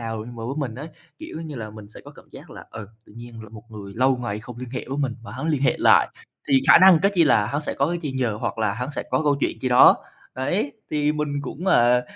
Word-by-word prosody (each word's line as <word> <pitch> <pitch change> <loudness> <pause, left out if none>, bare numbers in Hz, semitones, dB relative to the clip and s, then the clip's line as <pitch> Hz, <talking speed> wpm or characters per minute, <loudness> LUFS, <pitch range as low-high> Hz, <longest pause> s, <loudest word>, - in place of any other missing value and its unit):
nào, 115 -1 -5
nhưng 120 0 -10
mà 115 - -7
với 130 +4 -4
mình 130 -7 -3
á, 145 +5 -7 0.3
kiểu 160 - -8
như 160 -3 -7
là, 110 -2 -6
mình 105 -1 -12
sẽ - - -13
có - - -11
cảm - - -18
giác - - -13
là, - - -11
ừ, 105 -3 -9 0.2
tự - - -18
nhiên 120 -1 -10
rồi 110 -2 -12
một 110 -1 -12
người 100 -2 -9
lâu 130 +2 +2
ngày 120 -4 -5
không 120 +1 -11
liên 125 -1 -8
hệ 125 - -5
với 135 - -4
mình 135 -5 -2
mà - - -10
hắn 160 - -5
liên 150 -4 0
hệ 130 - +2
lại - - +5 0.4
thì 135 -1 +4
khả - - +9
năng, 185 -2 +7
cái 200 +1 +3
chi 170 -3 +4
là 105 -7 +3
hắn 145 +6 -2
sẽ 150 - -4
có 140 - +1
cái 175 +2 -2
chi 145 -4 -4
nhờ 125 -5 -1
hoặc - - -3
là 110 -2 0
hắn 125 +4 -5
sẽ 145 - -4
có - - +1
câu 145 -2 +2
chuyện - - -2
chi 130 - -1
đó. 125 0 +7 0.4
Đấy, 185 - -2 0.2
thì 150 0 +1
mình 150 -2 -3
cũng, 155 +7 -7
à, 125 -6 +4
125 Hz, 290 wpm, -23 LUFS, 115-145 Hz, 0.4 s, khả